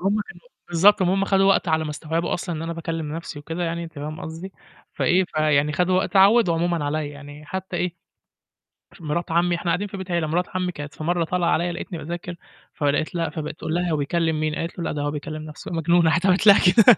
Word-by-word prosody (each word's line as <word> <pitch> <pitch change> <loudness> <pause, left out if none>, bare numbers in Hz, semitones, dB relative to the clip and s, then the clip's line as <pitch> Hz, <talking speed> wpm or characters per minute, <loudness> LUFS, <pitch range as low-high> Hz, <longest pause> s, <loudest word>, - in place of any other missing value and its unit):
هُم 200 +3 +1
كانم - - -12 0.3
بالضبط 185 +4 +5
،ما 185 +1 +2
هُم 195 - +1
خَدوا 195 0 +3
وقت 195 -2 +3
على 160 0 +2
ما 150 - -4
استوعبوا 160 +2 -2
أصلًا 175 0 -4
إن 155 - -5
أنا 165 0 -3
باكّلم 165 -2 -4
نَفْسي 165 -2 -7
وكده 165 +4 -5
يعني، 170 0 -3
أنتِ 165 - -10
فاهمة 150 +1 -6
قصدي، 165 +4 -7 0.4
فإيه، 185 +2 +2
فيعني 150 -3 +1
خدوا 180 +3 +2
وقت 190 -1 -1
اتعوّدوا 200 -1 +5
عمومًا 170 -1 0
عليّا، 150 +2 -1
يعني 145 +1 -11
حتى 190 0 -5
إيه، 175 -1 -1 1.1
مِراة 165 +1 -2
عمي 170 +1 +2
إحنا 170 0 -1
قاعدين 185 +5 0
في 195 - -8
بيت 190 -1 -6
عيلة، 170 -2 0
مِراة 170 +4 +1
عمي 180 -1 0
كانت 145 -3 -8
في 155 - -8
مرة 175 +1 +1
طالعة 175 +1 0
عليّا 175 +2 +1
لقيتني 175 +1 -6
باذاكر 175 +2 -6 0.4
فلقيت 145 +2 0
لأ 165 -2 0
فبقت 150 0 -5
تقول 160 - -3
لها: 175 0 0
"هو 155 - +1
بيكلّم 160 +2 0
مين؟" 155 0 -1
قالت 165 +1 -4
له: - - -2
"لأ، - - -2
ده 145 - -3
هو 145 0 -1
بيكلّم 155 +1 -5
نَفْسه، 155 0 -9
مجنون" 170 +1 +3
راحت 170 +3 +2
علمت 190 +2 +3
لها 200 - +9
كده. 215 +3 +7
170 Hz, 235 wpm, -23 LUFS, 155-180 Hz, 1.1 s, لها